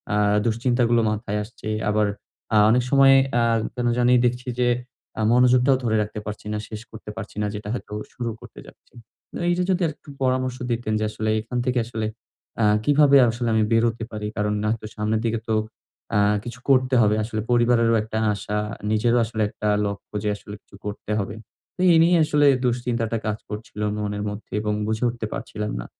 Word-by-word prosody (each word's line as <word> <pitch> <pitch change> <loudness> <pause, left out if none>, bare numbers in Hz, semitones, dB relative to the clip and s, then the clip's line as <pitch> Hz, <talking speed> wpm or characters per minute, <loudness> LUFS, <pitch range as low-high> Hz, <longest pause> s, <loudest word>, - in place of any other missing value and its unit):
আ - - +2 0.3
দুশ্চিন্তাগুলো 120 0 +2
মাথায় 105 -1 -2
আসছে। 110 0 -9 0.2
আবার 105 0 +2 0.5
আ - - +6
অনেক 120 +2 +3
সময় 135 -1 +6 0.3
আ - - +3 0.3
কেন 120 -1 -1
জানি 125 0 +4
দেখছি 125 +1 -1
যে, 125 - +3 0.5
আ - - 0
মনোযোগটাও 125 +2 +5
ধরে 110 -2 +1
রাখতে 105 0 -4
পারছি 105 0 -7
না। - - -1
শেষ 110 0 -6
করতে 110 -1 -10
পারছি 105 -3 -8
না। 105 - 0
যেটা 105 0 -6
হয়তো 115 - -6 0.2
শুরু 120 -2 -3
করতে - - -13
যাচ্ছি। - - -19 0.4
ও - - -3
এইযে 180 +1 +1
যদি 185 0 0
আরেকটু 150 -1 -9
পরামর্শ 130 -1 0
দিতেন 115 -2 -1
যে, - - -1
আসলে 110 0 -3
এখান 115 +3 -5
থেকে 125 -1 +1
আসলে 110 -2 -4 0.6
আ - - +3 0.2
কিভাবে 145 -1 +5
আসলে 120 +1 -2
আমি 110 -1 +3
বেরোতে 115 0 +2
পারি? 105 -1 -4
কারণ, 105 0 0
না 105 - +1
তো - - -10
সামনের 110 +1 0
দিকে 115 0 0
তো 110 - +1 0.6
আ - - +4 0.3
কিছু 120 +1 -8
করতে 130 -1 +4
হবে। 105 0 +3
আসলে 110 -1 -3
পরিবারেরও 120 -1 +3
একটা 110 0 -5 0.2
আশা, 105 +1 -4 0.3
নিজেরও 115 +3 +3
আসলে 110 -1 -4
একটা 105 -1 -4 0.2
লক্ষ্য 100 +1 -6
যে, 105 - 0
আসলে 105 0 -10
কিছু - - -19
করতে 105 0 -5
হবে। 100 +2 -4 0.4
তো - - -30
এই 165 - +6
নিয়ে 175 +1 +4
আসলে 150 -1 +3 0.2
দুশ্চিন্তাটা 120 -2 -1
কাজ 105 0 -1
করছিল 105 0 -7 0.2
মনের 105 -1 -3
মধ্যে 105 +1 -9
এবং 105 -1 -1
বুঝে 110 +2 -1
উঠতে 120 -2 -5
পারছিলাম 105 0 -4
না - - -6
115 Hz, 190 wpm, -23 LUFS, 105-125 Hz, 0.6 s, আ